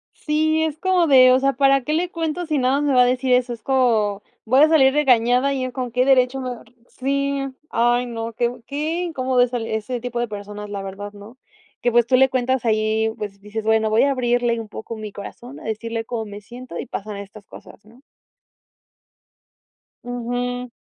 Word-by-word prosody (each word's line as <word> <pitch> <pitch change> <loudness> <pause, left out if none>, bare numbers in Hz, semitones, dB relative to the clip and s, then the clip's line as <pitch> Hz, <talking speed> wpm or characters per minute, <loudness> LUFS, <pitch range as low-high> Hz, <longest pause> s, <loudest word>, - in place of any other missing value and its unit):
Sí, 315 +1 +1
es 310 -2 -2
como 370 -2 +2
de: 255 -3 +7
"¿O 255 - +5
sea, 275 0 +2
para 275 0 +3
qué 300 - -3
le 345 +3 0
cuento, 330 +1 -3
si 305 -2 0
nada 265 +2 +2
más - - -1
me 275 - +2
va 250 - +6
a - - +6
decir 250 +1 +1
eso?" 250 -1 +2
Es 225 -2 -8
co 225 -6 +1 0.2
voy 255 +4 +3
a 310 - +7
salir 270 -5 +5
regañada 255 -1 +3
y 265 - -2
en 255 - -3
con 250 -1 -5
qué 250 +1 +2
derecho 265 0 +3
me 255 - -4
va 245 - -5
a - - -14
r 225 - -24 0.2
Sí, 280 +1 -1 0.3
ay 240 +1 +2
no, 230 -1 -5
qué 235 +1 0
bu 240 -1 -10
qué 310 +5 -2
incómodo 260 -6 0
esa 245 0 0
l 225 -1 -5
ese 235 +3 -3
tipo 245 0 -4
de 240 -1 -1
personas, 205 0 -7
la 200 -1 -5
verdad, 200 +1 -7
¿no? 210 +5 -13 0.4
Que, 245 - +2
pues, 240 -1 +4
tú 255 - +4
le 265 +1 +5
cuentas 255 -1 -1
ahí, 220 0 +1
pues, 200 -2 -7
dices, 210 +2 -6
bueno, 220 0 +2
voy 215 +1 +3
a 280 - +3
abrirle 240 -2 +1
un 220 - -8
poco 225 +2 -7
mi 210 -2 -7
corazón, 245 +6 -10
a - - -13
decirle 225 +1 -4
cómo 225 -2 -4
me 205 0 -9
siento 250 +4 -9
y - - -4
pasan 210 -4 -6
estas 200 +1 -11
cosas, - - -14
¿no? 235 +4 -19 2.0
Ujú. 245 +1 -3
245 Hz, 220 wpm, -21 LUFS, 220-265 Hz, 2.0 s, de